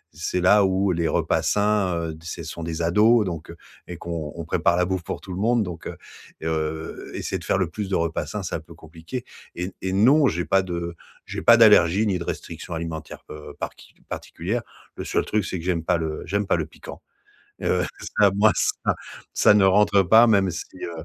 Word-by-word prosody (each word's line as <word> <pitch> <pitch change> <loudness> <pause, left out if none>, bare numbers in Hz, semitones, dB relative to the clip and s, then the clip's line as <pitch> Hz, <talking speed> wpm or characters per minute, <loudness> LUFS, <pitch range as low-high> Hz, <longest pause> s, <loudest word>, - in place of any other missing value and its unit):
C'est 85 +3 -2
là 100 +3 +5
où 95 0 +2
les 85 -1 0
repas - - +1
sains, 105 -3 +1
heu, 80 -2 -4
c'est 80 - -7
sont 85 - -7
des 80 0 -3
ados 105 +6 +4
donc, 85 -4 -5
heu, 85 - -10 0.3
et 90 - -7
qu'on 80 -4 -5
on 85 -2 -6
prépare 85 +1 +1
la 90 - +2
bouffe 95 -1 -2
pour - - -5
tout 95 - -10
le 90 - -5
monde. 115 +1 +2
Donc, 90 -4 -7
heu, - - -7 0.5
heu, 80 0 -3
essayer - - -3
de - - -12
faire - - +1
le 95 -3 +1
plus 100 +3 -5
de 95 - 0
repas 85 0 -1
sains, 105 -2 -5
c'est 85 - -5
un - - -1
peu 85 +1 -15
compliqué. 80 +9 -8 0.3
Et 90 - -4
n 95 - -6
et 95 - -2
non, 130 +10 +5
j'ai 90 -4 -1
pas 95 - +3
de 85 -2 -4 0.3
j'ai - - -5
pas 115 - +7
d'allergie 105 -3 +6
ni 95 -4 0
de 85 - -4
restriction 85 - -6
alimentaire, 80 -1 -6
heu, 75 0 -9
par - - -4
qui - - -18
particulière. 105 +9 -4 0.4
Le - - -4
seul - - -1
truc, 105 -2 0
c'est - - -3
que 85 - -8
j'aime 85 -3 0
pas 85 - +2
le 80 -2 -3
j'aime 100 +3 0
pas - - +1
le - - -3
piquant. - - -11 0.6
Heu, - - +1 0.3
ça, 100 -2 +6
moi, 110 +2 +5
ça - - 0 0.4
ça - - +5
ne 100 -2 +5
rentre 100 +1 +4
pas, 110 +6 +6
même 100 -4 +3
si, 85 - -5 0.2
heu, 85 -2 -6
90 Hz, 225 wpm, -24 LUFS, 85-100 Hz, 0.6 s, pas